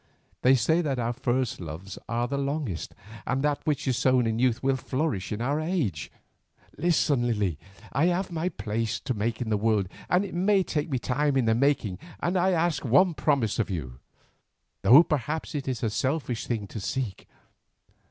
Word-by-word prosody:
They 130 +1 +6
say 160 +8 +2
that 140 -5 -1
our 120 0 -1
first 130 0 -1
loves 85 +3 -7
are 120 +1 0
the 140 - -3
longest, 140 - -3 0.3
and 130 +2 0
that 145 -1 +1
which 150 -2 -1
is 130 -2 +1
sown 130 -2 +3
in 115 0 0
youth 125 -1 +1
will 135 0 +2
flourish 130 - -2
in 110 +2 -2
our 145 +4 0
age. 155 - -2 0.6
Listen, 145 -7 +2
Lily; 100 -9 0 0.3
I 145 - +3
have 180 +1 0
my 170 +2 -1
place 115 - -2
to 130 - -2
make 110 +2 -2
in 110 - -4
the 105 - +3
world, 105 -2 +1 0.2
and 180 +3 +3
it 185 - -8
may 190 +2 +3
take 155 -2 -2
a 130 - +1
time 135 +3 0
in 130 - +2
the 115 - +3
making, 115 -7 +1 0.2
and 175 - -1
I 185 +1 +3
ask 170 -2 +1
one 145 +8 +4
promise 140 -9 +1
of 110 - 0
you, 65 -9 -5 0.8
though 140 +8 +8
perhaps 155 +1 -2
it 145 -3 -4
is 130 -2 -2
a 115 - +2
selfish 130 -1 -1
thing 110 -4 -2
to 110 - -6
seek. 110 0 -4
130 Hz, 190 wpm, -27 LUFS, 115-150 Hz, 0.8 s, though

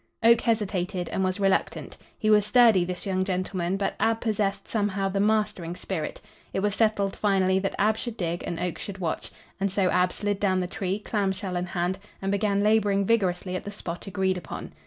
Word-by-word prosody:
Oak 230 0 +6
hesitated 190 -5 -1
and 190 - -1
was 185 +1 -1
reluctant. 195 -1 0 0.2
He 215 -1 +1
was 210 -1 +6
sturdy, 220 -3 +5
this 180 0 -4
young 185 -1 0
gentleman, 185 -1 -1
but 195 0 -1
Ab 225 0 +2
possessed, 210 -3 -1
somehow, 200 -3 0
the 195 +1 -1
mastering 210 -5 +1
spirit. 180 -4 -4 0.3
It 190 - 0
was 205 0 +1
settled 205 -3 +1
finally 190 -2 +2
that 195 0 -2
Ab 215 +2 +2
should 235 0 -5
dig 170 -1 -2
and 170 - -3
Oak 180 -1 -3
should 200 -1 -6
watch. 170 -4 -3 0.3
And 195 0 0
so 190 -1 +2
Ab 180 0 +3
slid 205 -1 -2
down 190 -2 +2
the 180 - 0
tree, 190 +1 -2
clamshell 195 -3 -2
in 175 0 -1
hand, 180 +1 -1 0.2
and 195 0 -2
began 200 0 +1
laboring 205 -2 +3
vigorously 185 -4 +1
at - - -3
the - - -6
spot 180 -3 -6
agreed 190 -1 0
upon. - - -8
195 Hz, 200 wpm, -26 LUFS, 185-210 Hz, 0.3 s, Oak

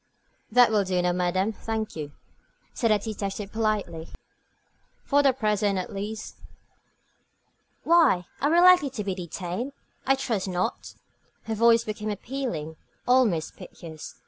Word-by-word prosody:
"That 245 0 +6
will 210 -2 +3
do, 185 -1 -1
madame, 185 +4 0
thank 220 0 -4
you," 150 -2 -6 0.6
said 230 - 0
the 215 - +5
detective, 205 -1 -5
politely, 210 -7 -2 1.0
"for 285 0 +3
the 275 -1 +5
present 210 -5 0
at 185 - -4
least." 210 +2 -6 1.5
"Why, 315 - +4 0.2
are 290 - +2
we 335 +2 +4
likely 360 -5 +6
to 240 -5 -5
be 195 -1 -2
detained? 185 - -5 0.3
I 270 - +5
trust 225 -7 -2
not." 185 +5 -3 0.5
Her 225 - -3
voice 230 +1 +4
became 215 0 -4
appealing, 205 - -4 0.3
almost 240 -11 +2
piteous. 160 -2 -10
215 Hz, 130 wpm, -26 LUFS, 185-245 Hz, 1.5 s, That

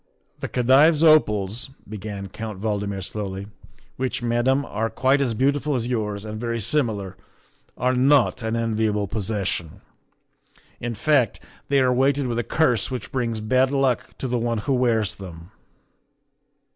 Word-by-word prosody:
" - - -42
The - - -3
Khedive's 140 +6 +4
opals," 110 - +3 0.2
began 100 -1 -6
Count 105 0 -7
Valdmir 100 -2 -2
slowly, 100 0 -5 0.3
" - - -32
which, 130 -1 -2
Madame, 120 +4 +1
are 110 -1 -2
quite 130 +5 +2
as 120 -5 0
beautiful 140 +4 +1
as 120 -2 -1
yours 105 -4 -2
and 110 0 -6
very 115 -1 -2
similar, 105 -6 -1 0.6
are 125 +1 +1
not 130 0 +3
an 110 0 -2
enviable 110 -2 0
possession. 100 -5 -3 1.0
In 120 -1 -4
fact, 130 -1 +2 0.3
they 140 0 +3
are 130 -1 +3
weighted 135 +2 +2
with 120 -1 -1
a - - 0
curse 125 -8 +1
which 130 -2 -5
brings 115 -5 -2
bad 130 +4 +2
luck 135 -3 0
to 130 - -4
the 125 -1 0
one 115 0 -1
who 140 - +1
wears 115 -5 +1
them." 85 -1 -11
115 Hz, 155 wpm, -23 LUFS, 105-130 Hz, 1.0 s, Khedive's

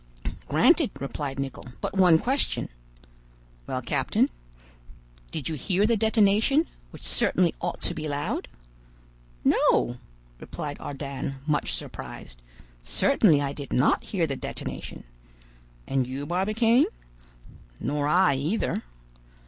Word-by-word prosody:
"Granted," - - +4
replied 140 0 -4
Nicholl; 135 -2 -5
"but - - -3
one 180 -4 +6
question." 265 - 0 1.0
"Well, - - -3
captain?" - - +1 1.0
"Did 150 - -4
you 160 - -2
hear 185 +7 +1
the 230 +1 +3
detonation, 220 +7 +3 0.2
which - - -13
certainly 180 -3 +2
ought 175 0 -3
to - - 0
be 155 0 -4
loud?" 145 0 -2 1.0
"No," 120 - +3 0.4
replied 145 -1 -6
Ardan, 140 -1 -5
much 150 -1 0
surprised; - - -9 0.4
"certainly 165 - +3
I 140 0 -2
did 140 -2 -8
not 125 - +3
hear 180 -5 0
the 140 -3 -2
detonation." - - -6 0.8
"And 130 -2 +1
you, 135 +3 -4
Barbicane?" 215 - +3 0.9
"Nor 145 +2 -1
I, 180 +1 +4
either." 155 +11 -1
155 Hz, 115 wpm, -26 LUFS, 140-200 Hz, 1.0 s, one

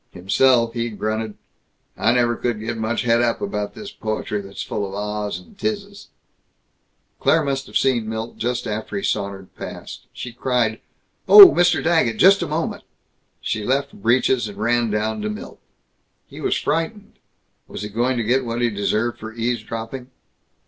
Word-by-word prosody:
Himself, 115 +6 +3
he 120 0 -2
grunted, 110 0 -3 0.6
"I 110 - +2
never 120 -1 +2
could 120 -3 -2
get 115 +2 -4
much 110 +2 -2
het 115 0 +3
up 120 -1 +1
about 105 0 -3
this 205 -1 -8
poetry 110 - -3
that's 100 0 -7
full 100 -2 -3
of 95 - -8
Ah's 105 -1 -3
and 90 - -16
'tises." 205 0 -4 1.1
Claire 160 0 +3
must 135 -1 -2
have - - 0
seen 120 -5 +1
Milt 110 +1 -5
just 120 +1 -2
after 105 0 -4
he 100 - -1
had - - -3
sauntered 100 -2 -3
past. - - -9
She 125 - -7
cried, 120 -3 0 0.5
"Oh, 400 -3 +12
Mr. 175 0 +2
Daggett! 160 -10 +2
Just 195 +1 +6
a 170 - -1
moment!" 155 +2 -3 0.6
She 110 - -2
left 135 +4 0
Breeches, 120 +1 +1
ran 115 +3 0
down 105 +1 -1
to 105 - -2
Milt. 105 - -8 0.7
He - - -11
was - - +1
frightened. 165 +7 -3 0.5
Was - - -7
he 105 - -5
going 120 +4 0
to 115 - 0
get 125 +4 +2
what 115 -1 -3
he 120 -1 +1
deserved 105 +3 -1
for 110 0 -7
eavesdropping? 115 +2 -4
115 Hz, 170 wpm, -21 LUFS, 105-130 Hz, 1.1 s, Oh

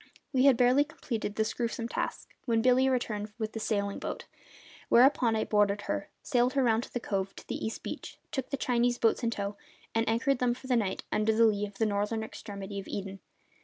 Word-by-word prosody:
We 260 0 +4
had 270 -4 +6
barely 250 +3 +5
completed 230 -8 -4
this 220 0 0
gruesome 230 -1 -2
task - - -3 0.2
when 230 -2 +2
Billy 255 +1 +5
returned 215 -5 -1
with 220 -2 -3
the 225 - -4
sailing 200 -2 -1
boat, - - -5 0.6
whereupon 245 -2 +5
I 220 - +1
boarded 205 -1 +2
her, - - -3
sailed 250 -1 +2
her 275 - +2
round 230 -1 +2
from - - -22
the 245 - -1
cove 195 -3 -2
to - - -12
the - - -4
east 220 - -4
beach, - - -6
took 265 -2 -3
the 275 - -2
Chinese 245 -1 +1
boats 225 - +2
in 235 - +1
tow, 200 -2 -3 0.4
and 225 0 +1
anchored 245 +4 +1
them 245 -1 +2
for 260 - -13
the 255 -1 +2
night 210 -5 0
under 215 +1 +2
the 230 +1 +6
lee 210 -1 +2
of 200 -1 -14
the 225 - +2
northern 210 +2 0
extremity 200 -2 -7
of 195 - -8
Eden. 195 -1 -5
225 Hz, 215 wpm, -30 LUFS, 205-245 Hz, 0.6 s, had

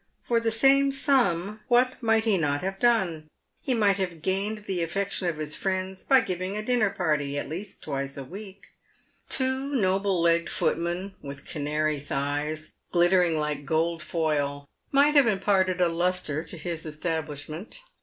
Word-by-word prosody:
For 235 -1 +2
the 230 0 0
same 275 +5 +4
sum 215 - +1
what 255 +1 +2
might 225 -1 +3
he 220 -3 +3
not 145 -5 0
have 195 +1 -3
done? 190 -10 +2 0.3
He 260 - 0
might 205 -4 +3
have 180 -5 -4
gained 205 +3 -1
the 185 -3 -2
affec 195 +4 -2
tion 180 - -1
of 165 -3 -1
his 155 0 -4
friends 190 +1 -3
by 265 -1 +5
giving 185 +2 -3
a 215 - -3
dinner 230 -3 +2
party 150 -7 -1
at - - -3
least 185 +6 -7
twice 140 -1 -3
a 140 - -5
week. 195 +7 -11 0.6
Two 265 +2 +1
noble 195 -3 +1
legged 170 0 +2
footmen, 175 +3 -1
with 140 0 -9
canary 150 0 -1
thighs, 145 +2 -3 0.2
glittering 175 -1 +3
like 150 -1 -2
gold 165 +3 0
foil, 145 -4 -1 0.3
might 285 +2 +5
have 285 -5 +6
imparted 190 -3 +2
a 180 - +4
lustre 170 -3 -1
to 175 - -7
his 165 0 -4
establishment. 155 - -5
180 Hz, 165 wpm, -26 LUFS, 155-210 Hz, 0.6 s, have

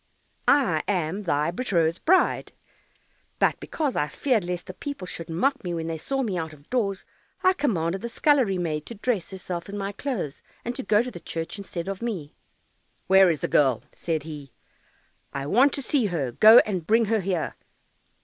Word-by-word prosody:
"I 235 - +4
am 180 0 -1
thy 150 0 +1
betrothed 175 -6 0
bride, 370 +3 +3 0.8
but - - +2
because 295 -5 -2
I 150 - +1
feared 245 - 0
lest 180 0 -4
the 185 - -8
people 285 -6 -6
should 165 -2 -7
mock 265 +12 0
me 175 -2 -3
when 165 -1 -3
they 165 -1 -4
saw 270 - -1
me 195 -7 -1
out 160 -1 -5
of 145 -1 -18
doors, 200 -6 0 0.4
I 370 - +5
commanded 190 - -1
the 235 - -4
scullery 255 -8 +2
maid 155 -4 -2
to 235 - -7
dress 215 -3 -1
herself 185 -2 -6
in 205 - -5
my 200 0 -3
clothes, 200 - -4 0.2
and 240 - -2
to - - -3
go 210 +2 +3
to 245 -8 -7
church 165 +4 -5
instead 180 -3 -5
of 195 +1 -4
me." 195 -11 -4 0.7
"Where 190 0 +6
is 155 -5 -1
the - - 0
girl?" 130 -6 +3
said 160 -3 -2
he; 145 -4 -9 0.8
"I 140 0 -3
want 255 - +4
to 280 - 0
see 255 -5 +1
her, 150 -9 -2
go 215 - +8
and 185 -6 -3
bring 225 +1 +4
her 220 +1 +1
here." 185 -4 -2
190 Hz, 190 wpm, -25 LUFS, 165-235 Hz, 0.8 s, go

